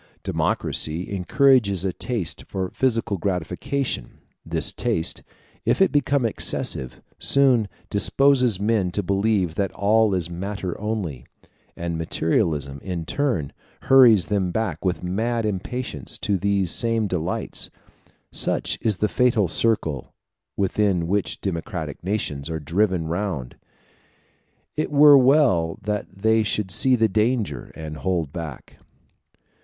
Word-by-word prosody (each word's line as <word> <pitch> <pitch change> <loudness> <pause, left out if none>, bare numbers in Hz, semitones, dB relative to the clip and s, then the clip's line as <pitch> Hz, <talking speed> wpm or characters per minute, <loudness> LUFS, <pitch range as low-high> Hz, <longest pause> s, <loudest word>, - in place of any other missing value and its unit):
Democracy 80 +4 -1
encourages 100 -1 +3
a 95 - -1
taste 110 -8 -3
for 95 -1 -3
physical 115 -5 0
gratification: 90 - -2 0.3
this - - 0
taste, 80 0 -1 0.4
if - - +1
it 195 - +4
become 140 -3 +1
excessive, 65 - -2 0.2
soon 130 -6 +3 0.2
disposes 125 +1 +3
men 105 -3 +1
to 100 +3 -2
believe 100 -2 +1
that 95 +2 -1
all 105 0 +3
is 90 -3 -1
matter 95 +1 -4
only; 100 - -4 0.5
and 85 -1 -3
materialism, 80 -4 0
in 90 -4 -4
turn, 95 - -1 0.3
hurries 120 -9 +6
them 95 +1 0
back 95 -6 -2
with 90 -2 -1
mad 115 +6 -1
impatience 100 - -4
to 100 - -1
these 100 -2 +1
same 115 -2 +2
delights: 90 -2 -3 0.6
such - - +1
is 110 -4 0
the 105 - +1
fatal 115 -4 +2
circle 80 - 0 0.4
within 95 -2 +1
which 85 -4 -1
democratic 85 - -4
nations 85 -7 -2
are 80 -1 -3
driven 90 +3 0
round. 85 -7 -3 1.2
It 155 - -1
were 145 0 +8
well 125 - +3
that 105 0 -2
they 110 +3 +2
should 105 -2 -1
see 130 +8 +4
the 110 -2 +3
danger 105 - -1
and 75 -1 -7
hold 85 -5 -2
back. 80 -5 -8
100 Hz, 125 wpm, -23 LUFS, 85-110 Hz, 1.2 s, were